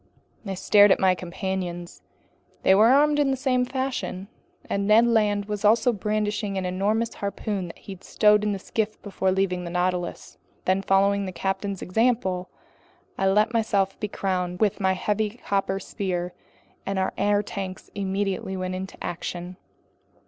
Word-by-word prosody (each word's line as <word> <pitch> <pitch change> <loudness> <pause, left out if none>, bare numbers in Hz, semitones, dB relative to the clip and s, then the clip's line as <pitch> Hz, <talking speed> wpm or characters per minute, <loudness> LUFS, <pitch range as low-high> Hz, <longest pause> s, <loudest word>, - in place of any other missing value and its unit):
I 195 - -3
stared 205 +2 +5
at - - +4
my 190 -1 +4
companions. 180 -1 -5 0.6
They 190 - +6
were 210 +3 +6
armed 295 +3 +4
in 285 -2 +3
the 265 - 0
same 255 -1 +1
fashion, 255 -7 -3 0.4
and 200 0 -1
Ned 220 +2 +6
Land 210 -3 +2
was 210 0 -4
also 225 +3 +4
brandishing 210 -1 -1
an 190 - -2
enormous 205 +5 0
harpoon 200 -2 -3
he - - -11
had 190 -1 -10
stowed 210 -1 +4
in 210 - +1
the 200 - -2
skiff 215 +2 -3
before 190 -2 -1
leaving 185 -1 0
the 175 - -5
Nautilus. 180 0 -2 0.3
Then, 190 +1 +2
following 195 +1 +2
the - - -4
captain's 195 +1 -3
example, 190 -3 0 0.7
I 195 - +1
let 210 +4 +3
myself 205 -4 +1
be 210 - -2
crowned 180 -3 -2
with 210 -3 +1
my 190 -1 +2
heavy 210 +4 -1
copper 195 -1 0
sphere, 180 -3 -3 0.5
and 195 0 -3
our 190 0 0
air 205 +1 +2
tanks 195 -2 -6
immediately 195 -1 -2
went 185 0 -3
into 190 +1 -6
action. 175 +1 -5
195 Hz, 160 wpm, -25 LUFS, 185-210 Hz, 0.7 s, They